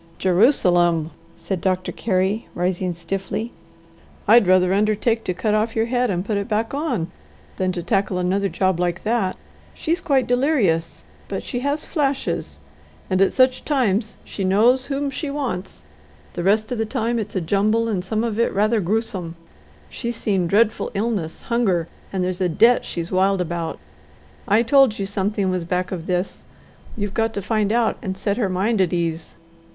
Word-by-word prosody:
"Jerusalem!" 175 - +3 0.3
said 190 -3 -4
Doctor 185 -1 0
Carey, 195 +1 -1
rising 180 +1 -1
stiffly. 195 +7 -4 0.8
"I'd 235 -4 +6
rather 185 0 +4
undertake 215 +3 +1
to 180 - 0
cut 210 +4 0
off 215 +1 0
your 225 0 +2
head 245 0 0
and 180 -1 -1
put 210 -1 -1
it 200 - -4
back 225 +1 -1
on 250 - -2 0.5
than 185 -1 0
to 175 -1 -4
tackle 195 -2 0
another 190 +2 0
job 185 +1 0
like 175 0 -1
that. 215 -4 0 0.4
She's 335 +3 -1
quite 275 -6 +2
delirious, 245 - +1 0.2
but - - -4
she 245 - -4
has 285 +3 -1
flashes, 280 -4 -2 0.5
and 185 0 +2
at 195 - +4
such 255 0 +3
times 230 -7 0
she 195 - -5
knows 230 +8 +3
whom 280 0 -2
she 295 +2 -4
wants; 260 -10 -4 0.5
the 175 - -4
rest 215 +5 +2
of 245 - -2
the 225 - +1
time 230 +2 -1
it's 210 -1 -5
a - - +2
jumble 205 +6 +1
and 195 -5 -1
some 215 +4 -1
of 230 -2 -2
it 235 - +4
is - - -10
rather 215 +2 +2
gruesome. 190 -3 -2 0.5
She's 240 -1 -4
seen 195 -6 0
dreadful 215 +4 +2
illness, 200 -6 -2
hunger, 200 -8 +1 0.3
and 190 -2 -1
there's 180 0 -2
a 180 - +2
debt 230 +9 +4
she's 170 0 -5
wild 190 +1 +2
about. 170 -1 -3 0.7
I 215 +3 +4
told 265 -2 +4
you 195 - -2
something 195 0 -1
was 180 -2 -1
back 180 +2 -2
of 175 -3 -5
this. 180 +1 -2 0.5
You've 205 -2 -3
got 225 0 0
to 200 - -2
find 215 0 0
out 235 0 +1
and 190 -1 -4
set 200 +1 -1
her 215 -6 0
mind 195 +3 +1
at 180 -1 +1
ease." 165 -2 -2
200 Hz, 180 wpm, -22 LUFS, 185-230 Hz, 0.8 s, I'd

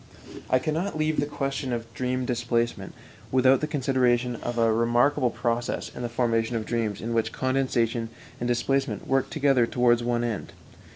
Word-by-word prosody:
I 130 - +4
cannot 155 +7 -2
leave 155 0 0
the 145 - 0
question 135 -2 -3
of 115 -1 -4
dream 125 +1 -1
displacement 120 -1 -1 0.4
without 130 +1 +4
the 155 - 0
consideration 125 -4 +1
of 120 +1 -4
a 115 -1 +3
remarkable 120 +3 +2
process 120 0 -2
in - - -6
the 120 - -3
formation 115 -1 0
of 110 -1 -2
dreams 115 -4 -2
in 115 +1 -3
which 110 -1 0
condensation 125 -3 0 0.3
and 120 - -2
displacement 120 -3 0
work 135 -1 +1
together 135 -6 +2
towards 120 -1 +3
one 120 0 0
end. 115 -4 -4
120 Hz, 165 wpm, -26 LUFS, 115-130 Hz, 0.4 s, I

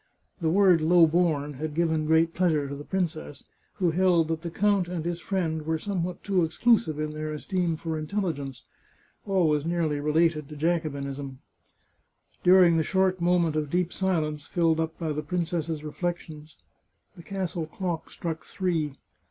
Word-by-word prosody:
" - - -38
The 160 - +1
word 185 -2 +5
low 170 +1 +6
born 155 -3 +1
had 150 +2 -5
given 160 -2 +1
great 160 +1 +3
pleasure 160 -6 +1
to 140 - -5
the 145 - -8
princess, 160 -5 -3 0.3
who 180 -4 +1
held 170 -2 +3
that 160 -1 -2
the 170 - -4
count 200 +1 +1
and 175 -2 -4
his 170 0 -2
friend 160 -2 -2
were 160 +1 -1
some 185 +1 -2
what 180 +1 -5
too 190 -3 +2
exclusive 160 -2 +2
in 155 0 -2
their 155 0 -4
esteem 175 +2 -1
for 160 -1 -3
intelligence 150 -7 -3 0.3
— - - -37
always 165 -7 +2
nearly 165 -3 0
related 150 0 +1
to 150 - -8
Jacobinism. 140 -4 -2 1.0
During 180 -2 +6
the 160 - +2
short 190 +1 +1
moment 170 -2 +2
of 150 -2 -1
deep 175 +2 0
silence 155 -6 -1
filled 165 -2 +1
up 160 0 -2
by 160 -3 -2
the 150 - -2
princess's 165 -3 -2
reflections, 155 -1 -5 0.6
the - - -11
castle 180 -3 -4
clock 175 -1 -4
struck 160 -2 -5
three. 165 -7 -2
165 Hz, 170 wpm, -27 LUFS, 155-180 Hz, 1.0 s, low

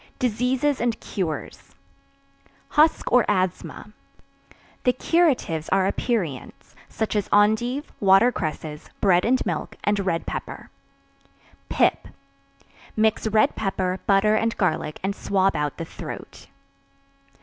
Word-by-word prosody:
Diseases 250 +4 0
and 235 -2 0
Cures. 170 -6 -5 0.9
Husk 310 +2 +3
or 250 -2 +6
Asthma. 190 +1 -2 0.9
The 250 - +3
curatives 255 - +1
are 195 -1 +3
aperients, 190 - -3 0.2
such 220 -1 -3
as 205 - -1
endive, 220 +7 +2
water 195 +5 +5
cresses, 155 -5 -5
bread 180 -3 +3
and 255 +3 +2
milk, - - -3
and 205 0 +1
red 185 -4 -1
pepper. - - -6 1.0
Pip. - - +1 0.9
Mix 220 0 +2
red 215 0 +3
pepper, 190 -2 -2
butter 200 +1 +4
and 225 +1 0
garlic 155 -5 -1
and 195 +1 -1
swab 195 -2 +1
out 150 -1 -2
the 165 - -4
throat. - - -9
205 Hz, 115 wpm, -24 LUFS, 185-240 Hz, 1.0 s, or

